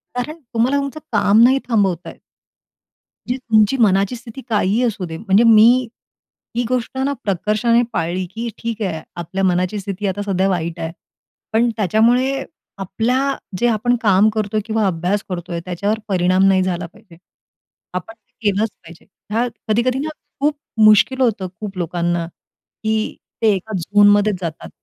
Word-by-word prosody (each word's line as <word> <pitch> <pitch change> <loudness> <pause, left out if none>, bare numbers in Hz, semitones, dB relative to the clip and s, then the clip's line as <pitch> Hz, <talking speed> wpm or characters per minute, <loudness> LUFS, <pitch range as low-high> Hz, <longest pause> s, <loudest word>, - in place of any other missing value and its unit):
कारण 300 +7 -4
तुम्हाला 240 +5 +2
तुमचं 280 +2 -3
काम 210 0 +4
नाही 260 +3 +5
थांबवता 195 -7 0
येत. - - -13 1.1
म्हणजे 250 - 0
तुमची 225 -1 +2
मनाची 200 0 +3
स्थिती 240 +2 -10
काहीही 210 +1 +1
असू 215 -6 -1
दे, 160 -1 -6
म्हणजे 205 +3 +3
मी 220 -2 +7 0.9
ही 240 - +1
गोष्ट 255 0 -2
ना 280 - 0
प्रकर्षाने 215 +5 +1
पाळली, 175 0 -1
की 235 +1 -4
ठीक 230 -1 -4
आहे, 170 -6 -2
आपल्या 175 +3 -4
मनाची 185 +2 +1
स्थिती 200 +1 -4
आता 195 +1 -2
सध्या 195 -1 0
वाईट 170 -3 -2
आहे. 160 - -3 0.6
पण 235 +2 +3
त्याच्यामुळे 240 +7 +2 0.3
आपल्या 240 +8 0 0.2
जे 240 - +3
आपण 240 +2 +1
काम 205 0 +4
करतोय 215 0 -1
किंवा 220 -1 0
अभ्यास 185 +4 -1
करतोय, 175 -1 -4
त्याच्यावर 200 +5 -1
परिणाम 185 -1 +2
नाही 190 -1 +4
झाला 180 -1 -2
पाहिजे. 170 0 -16 0.8
आपण 180 +5 -5
ते 225 +3 -49 0.2
केलंच 210 +3 0
पाहिजे. 165 0 -15 0.3
हे 235 +3 +1 0.2
कधी-कधी 235 +4 +1
ना 300 +3 -2 0.3
खूप 295 +1 +1 0.3
मुश्किल 215 +5 +5
होतं, 215 -7 +1
खूप 200 -3 -6
लोकांना, 175 0 -1 0.6
की 220 0 -1 0.3
ते 220 -2 +4
एका 215 +4 -6
झोनमध्येच 205 +3 +4
जातात. 165 -2 -5
210 Hz, 150 wpm, -19 LUFS, 185-235 Hz, 1.1 s, मी